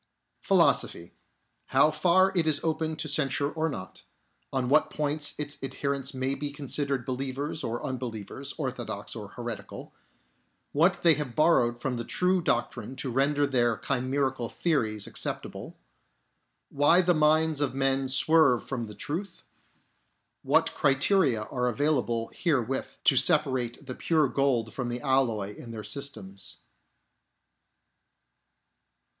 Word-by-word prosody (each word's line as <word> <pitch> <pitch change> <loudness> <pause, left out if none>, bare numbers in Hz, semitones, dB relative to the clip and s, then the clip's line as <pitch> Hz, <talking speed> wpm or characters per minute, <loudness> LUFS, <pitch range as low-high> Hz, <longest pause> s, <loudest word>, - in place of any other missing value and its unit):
Philosophy. 85 - +2 0.3
— - - -47
How 140 +3 +6
far 180 +5 +3
it 165 -3 +1
is 155 - +2
open 160 0 -1
to 155 - -4
censure 140 -1 0
or 160 0 -1
not 95 -10 -8 0.3
— - - -45
On 130 -2 -1
what 150 +4 +3
points 150 0 -1
its 150 0 -4
adherents 140 0 -2
may 130 0 -1
be 145 +1 -3
considered 140 -2 -2
believers 135 +3 -3
or 115 +1 -3
unbelievers, 130 +1 -5
orthodox 135 -5 -4
or - - -7
heretical - - -8 0.4
— - - -45
What 175 +5 +2
they 165 -2 +7
have 145 -5 -4
borrowed 125 -7 +3
from 125 0 -3
the 120 - -3
true 180 +7 +1
doctrine 120 -5 -2
to 130 -1 -3
render 140 +3 +2
their 120 -5 +1
chimerical 130 -2 -1
theories 110 - -1
acceptable - - -4 0.5
— - - -49
Why 145 +6 +4
the 180 0 +3
minds 155 -1 +3
of 135 -2 -1
men 135 0 +1
swerve 135 -1 +4
from 120 -4 -3
the 105 - -10
truth 170 +5 -5 0.5
— - - -47
What - - +3
criteria 140 - +2
are 125 +3 -2
available 120 -3 0
wherewith 135 -6 0 0.2
te 135 - +5
separate 130 -4 +2
the 130 - -5
pure 155 +1 +1
gold 125 -4 0
from 125 -2 -3
the 120 0 -4
alloy 115 -7 0
in 120 - -10
their 110 -2 -7
systems. 100 -7 -6
135 Hz, 140 wpm, -28 LUFS, 125-150 Hz, 0.5 s, they